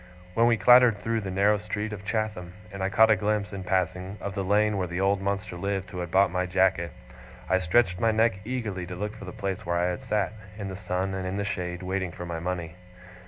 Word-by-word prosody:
When 115 Hz, +3 st, +4 dB
we 120 Hz, -1 st, +4 dB
clattered 125 Hz, -2 st, +7 dB
through 115 Hz, +2 st, -1 dB
the 100 Hz, -, -5 dB
narrow 100 Hz, +3 st, +3 dB
street 105 Hz, +1 st, -4 dB
of 100 Hz, -1 st, -7 dB
Chatham, 105 Hz, -5 st, -2 dB, 0.2 s
and 100 Hz, -, -6 dB
I 95 Hz, -, +1 dB
caught 110 Hz, +3 st, +5 dB
a -, -, +6 dB
glimpse, 105 Hz, +1 st, -1 dB
in 95 Hz, -1 st, -5 dB
passing, 95 Hz, +1 st, -1 dB
of 100 Hz, -, -5 dB
the 100 Hz, -, -2 dB
lane 105 Hz, +2 st, +2 dB
where 90 Hz, -2 st, -1 dB
the 85 Hz, +1 st, -4 dB
old 100 Hz, 0 st, +2 dB
monster 100 Hz, 0 st, -2 dB
lived 95 Hz, +1 st, -3 dB
who 90 Hz, -, -5 dB
had 90 Hz, -1 st, -4 dB
bought 95 Hz, +1 st, +4 dB
my 90 Hz, 0 st, -1 dB
jacket, 95 Hz, -2 st, +2 dB, 0.6 s
I 95 Hz, +1 st, +3 dB
stretched 90 Hz, 0 st, +2 dB
my 115 Hz, -, +3 dB
neck 110 Hz, -2 st, +2 dB
eagerly 105 Hz, -7 st, -3 dB
to 90 Hz, -, -6 dB
look 105 Hz, +4 st, -4 dB
for 110 Hz, -, -9 dB
the 90 Hz, -, -7 dB
place 95 Hz, -1 st, -4 dB
where 85 Hz, 0 st, -1 dB
I 90 Hz, +1 st, +1 dB
had 90 Hz, -, -5 dB
sat, 105 Hz, -1 st, -1 dB, 0.2 s
in 100 Hz, -2 st, -5 dB
the 95 Hz, -, -5 dB
sun 95 Hz, 0 st, -2 dB
and 95 Hz, -1 st, -3 dB
in 95 Hz, +2 st, -3 dB
the 100 Hz, -, -1 dB
shade, 90 Hz, -3 st, -3 dB
waiting 95 Hz, -1 st, -2 dB
for 90 Hz, -, -7 dB
my 85 Hz, -1 st, -4 dB
money. 85 Hz, -1 st, -4 dB
95 Hz, 245 wpm, -27 LUFS, 90-105 Hz, 0.6 s, clattered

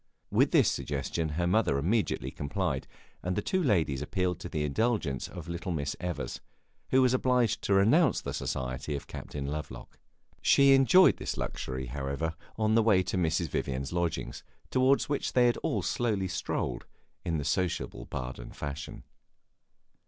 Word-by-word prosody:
With -, -, +4 dB
this -, -, +4 dB
suggestion 75 Hz, +3 st, -2 dB
her 85 Hz, +3 st, 0 dB
mother 90 Hz, -6 st, +2 dB
immediately 80 Hz, -, 0 dB
complied, 70 Hz, 0 st, -2 dB, 0.3 s
and 90 Hz, +1 st, -2 dB
the 105 Hz, -, 0 dB
two 185 Hz, -, 0 dB
ladies 80 Hz, -, +1 dB
appealed 90 Hz, +2 st, -1 dB
to -, -, -7 dB
the 75 Hz, -, -2 dB
indulgence 75 Hz, -, 0 dB
of 85 Hz, -3 st, -9 dB
little 85 Hz, +1 st, -4 dB
Miss 70 Hz, -4 st, -2 dB
Evers, 90 Hz, -6 st, -4 dB, 0.5 s
who 130 Hz, 0 st, +5 dB
was 125 Hz, -1 st, +3 dB
obliged 125 Hz, -3 st, +2 dB
to 100 Hz, -, +3 dB
renounce 120 Hz, -, +4 dB
the -, -, -5 dB
society 65 Hz, +3 st, -3 dB
of 70 Hz, -, -6 dB
Captain 70 Hz, -1 st, -6 dB
Lovelock. 70 Hz, -4 st, -6 dB, 0.4 s
She 140 Hz, 0 st, +6 dB
enjoyed 150 Hz, +8 st, +6 dB
this -, -, -4 dB
luxury, 65 Hz, 0 st, -4 dB
however, 70 Hz, +5 st, -3 dB, 0.2 s
on 110 Hz, 0 st, +2 dB
the 115 Hz, -, +5 dB
way 105 Hz, -4 st, +4 dB
to -, -, -3 dB
Mrs. 85 Hz, -2 st, +1 dB
Vivian's 65 Hz, +2 st, -3 dB
lodgings, 85 Hz, -2 st, -2 dB, 0.3 s
toward 130 Hz, +2 st, +4 dB
which 145 Hz, -1 st, -2 dB
they 120 Hz, -1 st, +5 dB
all -, -, -1 dB
slowly 105 Hz, -5 st, 0 dB
strolled, 90 Hz, 0 st, -3 dB, 0.4 s
in 85 Hz, -3 st, -1 dB
the 75 Hz, -, -3 dB
sociable 80 Hz, -6 st, -1 dB
Baden 65 Hz, -2 st, -6 dB
fashion. 70 Hz, -1 st, -6 dB
85 Hz, 155 wpm, -29 LUFS, 70-110 Hz, 0.5 s, She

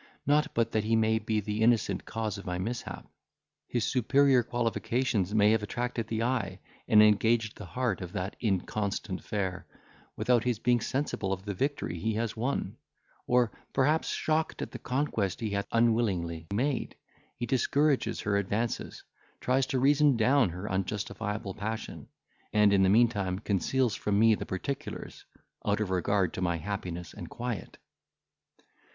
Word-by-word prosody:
Not 150 Hz, +2 st, +2 dB
but 115 Hz, -1 st, +1 dB
that 110 Hz, -, +1 dB
he 110 Hz, +1 st, +2 dB
may 110 Hz, 0 st, +3 dB
be 110 Hz, -1 st, -1 dB
the 105 Hz, +1 st, -3 dB
innocent 115 Hz, 0 st, +2 dB
cause 110 Hz, -2 st, -3 dB
of -, -, -10 dB
my 90 Hz, 0 st, -2 dB
mishap. 115 Hz, +7 st, -5 dB, 0.6 s
His 120 Hz, -2 st, -1 dB
superior 135 Hz, 0 st, +4 dB
qualifications 120 Hz, -3 st, -1 dB
may 105 Hz, 0 st, +5 dB
have 110 Hz, -1 st, +2 dB
attracted 120 Hz, +1 st, -3 dB
the 115 Hz, 0 st, -1 dB
eye, 115 Hz, -7 st, -1 dB, 0.3 s
and 105 Hz, 0 st, +7 dB
engaged 110 Hz, +1 st, +3 dB
the 105 Hz, -, -9 dB
heart 125 Hz, -2 st, -1 dB
of 90 Hz, -1 st, -6 dB
that 95 Hz, +3 st, -3 dB
inconstant 100 Hz, -2 st, -2 dB
fair, 95 Hz, -3 st, -3 dB, 0.5 s
without 125 Hz, -3 st, +2 dB
his 125 Hz, -3 st, 0 dB
being 120 Hz, +1 st, +2 dB
sensible 130 Hz, -7 st, -2 dB
of 95 Hz, +1 st, -3 dB
the 100 Hz, -, -2 dB
victory 135 Hz, -, -2 dB
he 110 Hz, +5 st, -1 dB
has 115 Hz, 0 st, -2 dB
won; 125 Hz, +5 st, -2 dB, 0.5 s
or, 125 Hz, -2 st, +3 dB, 0.2 s
perhaps, 150 Hz, +4 st, +2 dB
shocked 160 Hz, 0 st, -1 dB
at -, -, -7 dB
the -, -, -7 dB
conquest 125 Hz, -, -1 dB
he 110 Hz, -3 st, -2 dB
hath 100 Hz, 0 st, -1 dB
unwillingly 100 Hz, -9 st, +1 dB
made, 130 Hz, +6 st, -1 dB, 0.4 s
he 120 Hz, -, -2 dB
discourages 140 Hz, +3 st, +1 dB
her 100 Hz, -1 st, +1 dB
advances, 105 Hz, +4 st, -2 dB, 0.4 s
tries 130 Hz, +1 st, +1 dB
to 135 Hz, -, -1 dB
reason 140 Hz, 0 st, +4 dB
down 125 Hz, 0 st, +4 dB
her 90 Hz, +4 st, -6 dB
unjustifiable 105 Hz, +1 st, -3 dB
passion, 110 Hz, +2 st, -5 dB, 0.4 s
and 105 Hz, -1 st, +4 dB
in 100 Hz, -, +4 dB
the 95 Hz, -, +4 dB
meantime 100 Hz, -4 st, +3 dB
conceals 110 Hz, +5 st, 0 dB
from 105 Hz, -1 st, 0 dB
me 110 Hz, +1 st, +6 dB
the -, -, -3 dB
particulars, 135 Hz, +9 st, -5 dB, 0.4 s
out 105 Hz, 0 st, +1 dB
of 105 Hz, -3 st, -2 dB
regard 95 Hz, 0 st, +1 dB
to -, -, -4 dB
my 85 Hz, -2 st, +1 dB
happiness 90 Hz, -2 st, -5 dB
and -, -, -8 dB
quiet." 120 Hz, -4 st, -5 dB
110 Hz, 160 wpm, -29 LUFS, 100-125 Hz, 0.6 s, and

